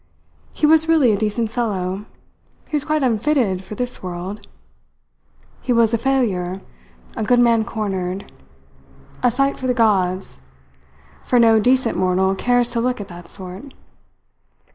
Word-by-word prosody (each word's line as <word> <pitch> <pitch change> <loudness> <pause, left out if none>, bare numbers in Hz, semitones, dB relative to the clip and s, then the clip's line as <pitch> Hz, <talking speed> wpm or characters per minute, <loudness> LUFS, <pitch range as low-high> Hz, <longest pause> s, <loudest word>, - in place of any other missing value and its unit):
He - - 0
was 320 +1 +4
really 300 -8 +5
a - - +2
decent 220 +2 -1
fellow, 200 -4 -2 0.6
he - - -4
was 290 - 0
quite 305 -1 0
unfitted 230 -5 +1
for 210 - -8
this 250 +1 -4
world, 185 +3 -6 1.1
he - - -2
was 230 -1 +3
a - - +3
failure, 205 -9 0 0.6
a 225 - -2
good 245 +3 +3
man 235 -2 +4
cornered 195 -3 -3 1.0
a 250 - +4
sight 275 +3 0
for 260 - -4
the 250 - +1
gods; 190 - +1 0.8
for 250 - +1
no 225 -2 +5
decent 250 +1 +2
mortal 185 +1 +2
cares 245 +4 +1
to 235 -1 -1
look 250 0 -1
at 205 - -7
that 175 0 -11
sort." 190 +8 -8
225 Hz, 145 wpm, -20 LUFS, 190-250 Hz, 1.1 s, really